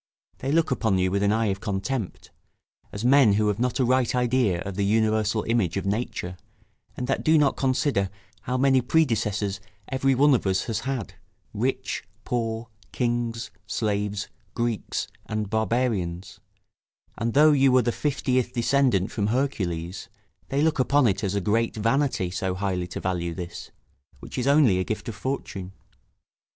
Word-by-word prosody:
they 135 - -2
look 160 -1 +2
upon 110 -6 +1
you 95 0 +1
with 100 +1 0
an 100 0 +3
eye 110 +1 +1
of 95 - -9
contempt, 100 +2 -3 0.6
as 105 +3 -5
men 130 -5 +6
who 105 +1 +2
have 105 +1 -1
not 125 0 0
a 130 - +3
right 130 0 +2
idea 125 -7 +2
of 100 - -5
the 100 - 0
universal 110 +1 +2
image 110 -7 0
of 100 - -2
nature, 100 -3 -3 0.6
and 125 - -2
that 135 - -1
do 160 0 +5
not 145 -3 +3
consider 130 -7 +1 0.3
how 125 +1 -2
many 135 0 +4
predecessors 110 -8 +1 0.3
every 135 0 +2
one 145 +2 +5
of 120 - +1
us 95 0 +1
has 115 - -2
had, 130 -5 -4 0.4
rich, - - -2 0.2
poor, 115 -1 -2 0.2
kings, 120 -1 -2 0.2
slaves, 105 -1 -1 0.3
Greeks, 120 -2 -2 0.2
and 110 -2 -3
barbarians; 110 -5 -1 0.8
and 115 +1 -2
though 155 +2 +7
you 135 -2 +4
were 130 -1 +4
the 120 - +1
fiftieth 130 -2 0
descendant 120 -5 +2
from 105 -2 -1
Hercules, 95 -9 -2 0.4
they 140 +2 +1
look 160 -2 +1
upon 140 +1 +3
it 100 -2 +1
as 100 0 -1
a 100 - 0
great 115 +4 +1
vanity, 115 -4 +1
so 95 0 -2
highly 95 -2 -2
to 90 - -6
value 85 -2 -2
this, 85 0 -7 0.5
which - - -6
is 125 - -1
only 140 -10 +5
a - - +1
gift 110 - -4
of - - -4
fortune. 100 -8 -4
115 Hz, 165 wpm, -25 LUFS, 100-130 Hz, 0.8 s, though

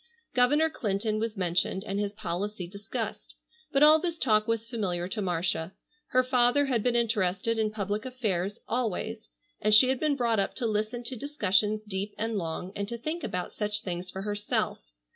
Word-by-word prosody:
Governor 295 +6 +4
Clinton 215 -3 -1
was 225 -1 -2
mentioned 180 +1 +1
and 200 -1 -3
his 205 -1 -1
policy 195 -1 -4
discussed. 200 +4 -5 0.4
But 275 0 +4
all 310 +1 +8
this 340 0 -2
talk 215 -7 +3
was 230 0 -1
familiar 185 -7 -2
to 210 +3 -3
Marcia. 175 -1 -1 0.3
Her 255 0 +3
father 255 +2 +3
had 250 -5 +1
been 245 +2 +1
interested 225 -1 +1
in 215 -1 +2
public 210 0 -2
affairs 210 -6 -2
always, 225 -1 -2 0.3
and 215 0 +6
she 255 +4 +8
had 260 -1 +1
been 305 -2 +2
brought 235 -5 +1
up 195 - -1
to 245 - -2
listen 215 +2 -1
to 250 +2 -2
discussions 215 -5 +1
deep 205 0 -4
and 225 +1 -2
long, 180 0 -3
and 200 0 -2
to 235 - -4
think 310 +8 -4
about 180 0 -3
such 210 0 -2
things 180 0 -4
for 190 +1 -6
herself. 205 0 -1
215 Hz, 180 wpm, -28 LUFS, 195-240 Hz, 0.4 s, all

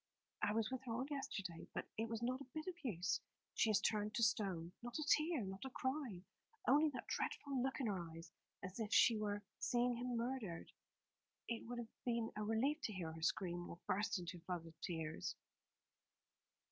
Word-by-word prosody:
"I - - +3
was 225 +1 +2
with 260 -1 -1
her 235 - -1
all 250 +3 0
yesterday; 195 - -3
but - - -1
it 225 +1 -1
was 225 0 -2
not 255 +3 +1
a 275 - -8
bit 310 0 -2
of 370 - -2
use. 190 -7 +1 0.3
She 225 - +4
has 210 -2 +6
turned 210 0 +1
to 235 - +3
stone. 195 -6 +2
Not 240 0 -3
a 310 - -1
tear, 310 -2 +4
not 190 0 -4
a 265 - -3
cry; 260 -8 -1 0.4
only 295 +4 +7
that 280 - -5
dreadful 275 -3 0
look 265 +3 0
in 265 - +1
her 200 -4 +1
eyes, 165 +1 -9 0.3
as 185 +4 -5
if 220 -1 -1
she 230 +1 +8
were 205 -1 0 0.2
seeing 245 0 +3
him 245 0 -1
murdered. 230 -8 -2 0.8
It 230 -1 -2
would 245 +1 -3
have 235 -2 -5
been 235 -2 +1
a 210 - -1
relief 250 +9 +2
to 215 - -1
hear 170 -4 -2
her 160 0 -8
scream, 175 0 +1
or - - -6
burst 205 +2 +2
into 180 0 -4
a - - -12
flood 175 -1 -3
of 165 0 -13
tears." 160 -3 -2
220 Hz, 200 wpm, -41 LUFS, 185-250 Hz, 0.8 s, she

